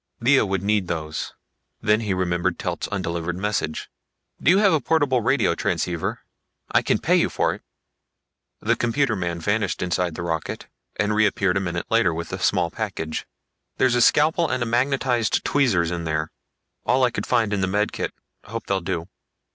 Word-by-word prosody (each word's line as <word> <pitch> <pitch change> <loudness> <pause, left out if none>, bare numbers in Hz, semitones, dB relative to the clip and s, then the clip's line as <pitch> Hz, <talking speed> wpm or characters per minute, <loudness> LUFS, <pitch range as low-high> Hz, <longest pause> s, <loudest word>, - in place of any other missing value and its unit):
Lea 130 +3 +4
would 95 -1 -1
need 105 -2 +1
those. 80 -2 -4 0.4
Then 105 0 +3
he 105 -3 -2
remembered 90 -1 0
Telt's - - -3
undelivered 85 -3 -3
message. 100 -5 -2 0.5
"Do - - +3
you 185 - +6
have 200 -3 +4
a 155 - +2
portable 140 -3 +2
radio 115 -4 +2
transceiver? 85 0 -2 0.5
I - - +4
can - - +1
pay - - +2
you - - +3
for - - 0
it." - - -10 1.0
The - - +2
computer 120 0 +1
man 85 -3 -3
vanished 100 +2 0
inside 90 -2 -1
the 85 - -5
rocket 80 -2 -3 0.3
and 105 +1 0
reappeared 100 -3 +2
a - - 0
minute 85 -2 -3
later 115 -8 +3
with 85 +2 -5
a 90 - -3
small 90 -3 +1
package. 95 -8 -4 0.5
"There's 130 -2 +3
a 120 - +3
scalpel 155 +6 +4
and 130 -2 0
a - - -2
magnetized 125 -1 +1
tweezers 100 - +2
in 85 -1 -3
here 80 0 -1 0.5
all 130 0 +2
I 125 - +3
could - - -4
find 115 -4 +2
in 100 - 0
the 95 - +1
med 105 +3 0
kit. - - -3 0.3
Hope 115 +2 -6
they'll 95 -1 0
do." 85 -2 -3
100 Hz, 180 wpm, -23 LUFS, 85-120 Hz, 1.0 s, you